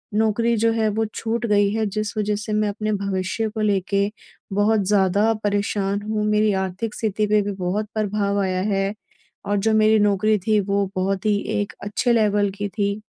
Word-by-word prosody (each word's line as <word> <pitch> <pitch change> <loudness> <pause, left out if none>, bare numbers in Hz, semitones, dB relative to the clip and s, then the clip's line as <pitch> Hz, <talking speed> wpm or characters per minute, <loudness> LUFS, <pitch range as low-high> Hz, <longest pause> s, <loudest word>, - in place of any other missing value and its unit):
नौकरी 225 +2 +2
जो 225 +1 +2
है 220 -1 +1
वो 220 +2 0
छूट 235 +1 -2
गई 205 -1 +3
है 220 -1 0
जिस 215 +1 -3
वजह 210 0 0
से 215 0 -4
मैं 215 0 +1
अपने 215 +1 -3
भविष्य 200 +2 -2
को 220 0 -5
लेके 200 0 +1 0.4
बहुत 210 +2 +3
ज़्यादा 205 +2 +3
परेशान 205 0 0
हूँ, 215 0 -2
मेरी 210 0 +2
आर्थिक 190 +3 -3
स्थिति 215 -1 -1
पे 210 0 +3
भी 200 0 -3
बहुत 195 +3 -2
प्रभाव 205 -1 0
आया 185 -1 0
है। 195 +1 0 0.5
और 205 0 0
जो 220 +2 +1
मेरी 215 0 +4
नौकरी 210 +1 +2
थी 215 -1 +4
वो 200 0 0
बहुत 190 +2 -1
ही 205 -1 +3 0.2
1 205 - -5
अच्छे 210 +4 0
लेवल 205 -2 +2
की 205 0 -2
थी 200 +1 -2
205 Hz, 185 wpm, -22 LUFS, 200-215 Hz, 0.5 s, मेरी